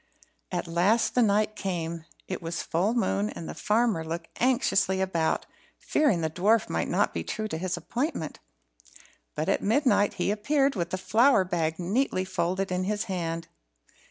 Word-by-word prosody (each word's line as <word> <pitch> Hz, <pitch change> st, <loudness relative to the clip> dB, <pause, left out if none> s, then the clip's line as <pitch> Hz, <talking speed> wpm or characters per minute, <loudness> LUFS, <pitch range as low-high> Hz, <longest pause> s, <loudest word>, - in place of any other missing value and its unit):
At 175 Hz, -2 st, -2 dB
last 180 Hz, +7 st, +2 dB
the 250 Hz, -, +3 dB
night 215 Hz, 0 st, +2 dB
came. 170 Hz, -4 st, -3 dB, 0.2 s
It 185 Hz, -, -4 dB
was 165 Hz, 0 st, -3 dB
full 195 Hz, +8 st, 0 dB
moon, 100 Hz, -, +1 dB
and 165 Hz, -, -7 dB
the -, -, -5 dB
farmer 215 Hz, -5 st, +1 dB
looked 165 Hz, +1 st, -5 dB
anxiously 235 Hz, -7 st, +2 dB
about, 170 Hz, -4 st, 0 dB, 0.3 s
fearing 260 Hz, -, +1 dB
the 160 Hz, -, 0 dB
dwarf 205 Hz, +7 st, +2 dB
might 80 Hz, 0 st, 0 dB
not -, -, +1 dB
be 85 Hz, -, -3 dB
true 215 Hz, -, -3 dB
to 160 Hz, -, -3 dB
his 185 Hz, +1 st, -2 dB
appointment. 245 Hz, -, -3 dB, 1.0 s
But -, -, -2 dB
at -, -, +1 dB
midnight 225 Hz, -2 st, +2 dB
he -, -, 0 dB
appeared, 275 Hz, +7 st, +1 dB
with 175 Hz, -4 st, -2 dB
the 185 Hz, -, -2 dB
flour 210 Hz, +5 st, +4 dB
bag 165 Hz, -3 st, -1 dB
neatly 190 Hz, +2 st, 0 dB
folded 185 Hz, +1 st, -1 dB
in 180 Hz, 0 st, 0 dB
his 205 Hz, +1 st, -1 dB
hand. 170 Hz, -5 st, -3 dB
185 Hz, 165 wpm, -27 LUFS, 170-215 Hz, 1.0 s, flour